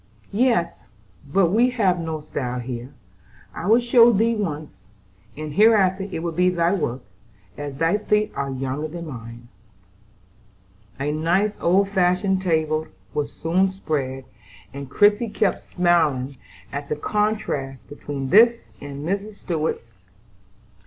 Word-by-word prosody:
"Yes, 220 -7 +1 0.5
but 180 0 +3
we 235 +5 +4
have 200 -8 +1
no 160 -2 -4
style 125 -4 -4
here. 125 +1 -6 0.6
I 175 - -5
will 225 +3 +6
show 240 0 +6
thee 230 +2 +2
once, 150 - -5 0.5
and 155 -1 -5
hereafter 195 -1 +4
it 165 - -4
will 170 - -1
be 180 +3 +2
thy 175 0 +1
work, 130 -9 -2 0.5
as 140 +1 -6
thy 165 +7 +2
feet 210 0 +1
are 140 0 -3
younger 135 +3 -3
than 170 +2 -7
mine." 120 -4 -9 1.5
A 145 +2 -1
nice 175 +7 +1
old 195 +3 +3
fashioned 190 0 +1
table 160 -3 0 0.3
was 145 -1 -2
soon 185 +4 +1
spread, 135 -8 -3 0.5
and 140 -1 -7
Christie 205 - +3
kept 210 -1 0
smiling 150 -7 +1 0.3
at 140 0 -5
the - - 0
contrast 150 -8 -2
between 140 -2 -5
this 235 +2 +5
and 140 +1 -7
Mrs. 200 +3 -3
Stuart's. 155 - -3
170 Hz, 130 wpm, -23 LUFS, 140-200 Hz, 1.5 s, will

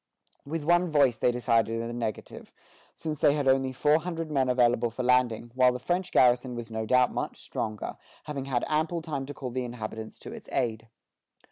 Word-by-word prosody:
With 160 +1 -3
one 175 +2 +3
voice 140 -6 +3
they 125 - +3
decided 115 -2 +1
in 115 - -3
the 120 - -5
negative, 115 -2 -5 0.4
since 155 -2 -4
they 140 - +5
had 145 -2 -1
only 130 0 +3
four 150 +4 +3
hundred 165 -2 -4
men 135 -3 +1
available 120 -1 +3
for 115 +3 -5
landing, 125 -2 +2
while 130 0 +5
the 125 - -3
French 175 +8 -2
garrison 125 0 +3
was 115 -1 -6
no 110 0 -3
doubt 125 +1 +4
much - - -4
stronger, 110 -1 -4 0.3
having 145 -3 -5
had 130 -3 -1
ample 160 +2 0
time 140 -5 -4
to 145 - -6
call 130 -3 -5
the 130 +1 -2
inhabitants 110 -2 -6
to - - -9
its - - -10
aid. 115 -2 -1
125 Hz, 200 wpm, -28 LUFS, 120-150 Hz, 0.4 s, they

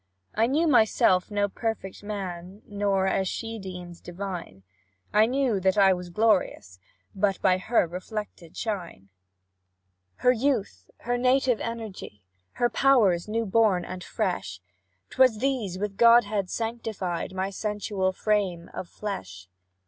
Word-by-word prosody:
I 225 +2 +2
knew 300 +6 +2
myself 220 - +3
no 205 -1 +1
perfect 210 -2 -4
man, 195 -1 -6
Nor, 200 -2 0
as 190 0 +1
she 225 +3 -4
deemed, 180 -3 -9
divine; 175 - -7 0.5
I 215 +1 +5
knew 255 -4 +1
that 190 +1 +1
I 195 -2 +6
was 180 -1 -6
glorious 180 - 0 0.3
but 195 -1 0
By 185 0 +4
her 220 +2 +2
reflected 180 -1 -7
shine; 175 - -5 1.1
"Her 250 - +3
youth, 225 - -1
her 245 +1 -1
native 255 -1 +2
energy, 220 - -7 0.3
Her 240 - +2
powers 225 -11 +3
new 225 +2 -1
born 200 -3 +2
and 185 0 -7
fresh, 90 - -3 0.5
'Twas 255 -4 +4
these 235 -7 -1
with 200 0 -4
Godhead 215 -5 +4
sanctified 220 -6 -4
My 190 +1 -2
sensual 205 -2 -2
frame 190 -4 -1
of 175 - -6
flesh. 95 - -6
200 Hz, 130 wpm, -26 LUFS, 180-225 Hz, 1.1 s, I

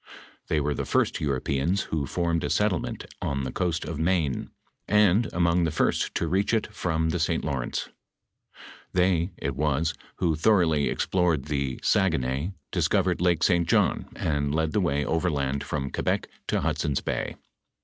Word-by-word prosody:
They 75 - +1
were 75 0 0
the - - -3
firet - - +1
Europeans 70 +6 0
who 75 -4 -1
formed 85 +1 0
a 75 - -1
settlement 105 -2 0 0.2
on 70 -1 -1
the 65 - -3
coast 85 0 -1
of 75 -1 -5
Maine, 80 -5 0 0.4
and 105 +1 +4
among 85 0 +2
the 80 - +2
first 75 - 0
to 85 - 0
reach 100 +7 +1
it 110 -1 -2
from 80 -5 0
tlie 85 0 -1
St. 80 +1 0
Lawrence. 70 -5 -2 1.0
They, 90 -1 +2
it - - -3
was, 75 +2 +1 0.2
who 85 -3 +1
thoroughly 80 -5 +3
explored 85 -7 +1
the 70 -3 -2
Saguenay, 80 -4 +1 0.2
dis - - +1
covered - - +1
Lake 85 -2 +2
St. 85 -3 +3
John, - - +2
and 70 -1 -1
led 80 0 +1
the 105 - +1
way 75 -4 0
overland 70 -5 0
from 70 -2 -3
Que - - -3
bec - - 0 0.2
to - - 0
Hudson's 70 -3 0
bay. - - -3
80 Hz, 165 wpm, -26 LUFS, 70-90 Hz, 1.0 s, and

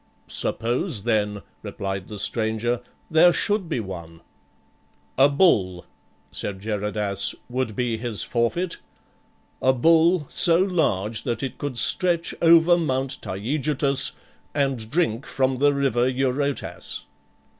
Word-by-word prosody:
"Suppose, 115 -2 -2
then," 105 -3 0 0.2
replied 95 -1 -5
the 105 - -8
stranger, 110 +3 0 0.3
"there 160 +3 +6
should 200 0 0
be 150 - -1
one." 85 -5 -8 0.9
"A 135 +2 +5
bull," 100 - +2 0.5
said 95 -2 -5
Geradas, 105 -1 -1
" - - -38
would 125 -4 -2
be 120 -1 -1
his 115 -2 -1
forfeit, 145 +10 -1 0.8
a 130 - +4
bull 165 +4 +3
so 170 -1 +5
large 140 - 0
that 120 0 -3
it 135 - -5
could 145 -4 -4
stretch 170 +6 +1
over 170 +1 +6
Mount 135 -4 -1
Taygetus 135 +6 -1 0.4
and 135 -6 -1
drink 135 -6 0
from 130 -1 0
the 145 +1 +4
river 130 -3 +1
Eurotas."" 135 +2 -2
130 Hz, 120 wpm, -23 LUFS, 110-150 Hz, 0.9 s, there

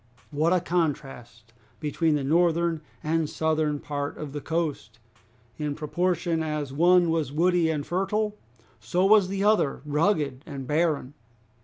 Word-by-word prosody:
What 155 +3 +1
a 185 - +4
contrast 135 -9 -3 0.3
between 155 +1 0
the 145 - -1
northern 170 +1 +2 0.2
and 160 0 0
southern 155 -2 0
part 145 0 -4
of 145 -2 -7
the 145 - -4
coast! 160 -4 -3 0.6
In 150 -1 -2
proportion 170 +2 -1
as 150 -3 -3
one 175 +2 +4
was 160 -4 -1
woody 170 +2 +2
and 150 -3 -2
fertile 205 +4 -1 0.4
so 125 - 0
was 205 -1 +6
the 195 +1 -2
other 205 -11 +2
rugged 150 -3 0
and 135 -3 -6
barren! 150 -2 0
160 Hz, 140 wpm, -26 LUFS, 145-175 Hz, 0.6 s, was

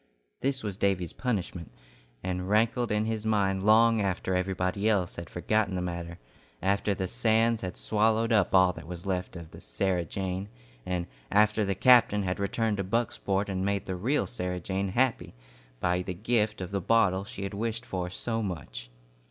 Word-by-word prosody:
This 135 0 -1
was 100 -3 -4
Davy's 95 -5 0
punishment, 95 - -3 0.5
and 90 0 -3
rankled 115 +3 +2
in 105 +1 +1
his 110 -1 -2
mind 100 -3 +1
long 110 +1 +5
after 95 -1 -1
everybody 95 +2 0
else 95 -5 +1
had 85 -1 -7
forgotten 100 +3 0
the 90 - -1
matter, 85 -1 -5 0.4
after 100 +1 +1
the 95 - -2
sands 115 +1 +2
had 90 -1 -5
swallowed 110 +2 +1
up 100 -3 +3
all 95 -1 +6
that 80 - -10
was 90 +1 -7
left 90 -1 -2
of 85 -2 -9
the - - -12
"Sarah 90 +9 -1
Jane," 95 +3 -4 0.4
and 90 -1 -1 0.2
after 105 +1 +3
the 100 -1 0
captain 110 -3 +5
had 90 0 -2
returned 105 +2 0
to 100 - -1
Bucksport 100 -1 -1
and 95 -1 -2
made 100 0 -1
the 95 - -3
real 125 +11 0
Sarah 90 -5 -4
Jane 95 +3 -2
happy 120 - 0 0.4
by 90 +3 +1
the 90 0 -5
gift 105 +1 0
of 90 0 -5
the 100 -1 -1
bottle 100 -2 +3
she 100 -1 -7
had 100 +1 -4
wished 115 +3 -3
for 90 -1 -3
so 115 +4 -3
much. 70 - -6
100 Hz, 180 wpm, -28 LUFS, 90-110 Hz, 0.5 s, all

